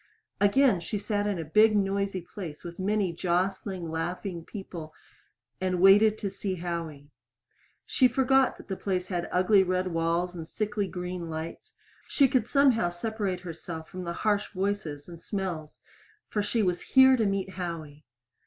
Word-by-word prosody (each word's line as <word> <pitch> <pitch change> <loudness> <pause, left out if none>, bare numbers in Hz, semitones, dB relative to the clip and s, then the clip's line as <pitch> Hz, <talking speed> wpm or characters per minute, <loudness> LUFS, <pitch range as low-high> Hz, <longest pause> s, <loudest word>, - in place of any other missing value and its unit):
Again 205 0 +4
she 190 +5 -4
sat 205 0 -1
in 205 -3 -1
a 165 - -4
big, 215 +7 +5
noisy 195 -1 0
place 170 -3 -8
with 170 0 -8
many 200 -2 0
jostling, 180 0 -1
laughing 175 +2 -3
people 170 -5 -8 0.7
and 185 -1 0
waited 205 +3 +6
to 200 - -3
see 190 -1 -3
Howie. 165 -5 -5 0.7
She 255 - +4
forgot 265 +1 +3
that - - -13
the 190 - -3
place 185 -2 -2
had 175 -2 -2
ugly 190 +2 +4
red 185 0 0
walls 170 +2 0
and 165 -2 -7
sickly 210 0 -2
green 180 -2 -5
lights; 165 - -7 0.3
she 275 - +4
could 250 -4 +1
somehow 260 -10 +3
separate 190 0 -3
herself 165 -2 -7
from 180 -1 -7
harsh 205 +4 0
voices 190 -7 -2
and 170 -1 -11
smells 180 -7 -4 0.5
for 210 - 0
she 215 +2 0
was 180 -2 0
here 265 0 +6
to 225 -4 +1
meet 195 -1 -1
Howie! 165 -5 -6
185 Hz, 155 wpm, -28 LUFS, 170-205 Hz, 0.7 s, waited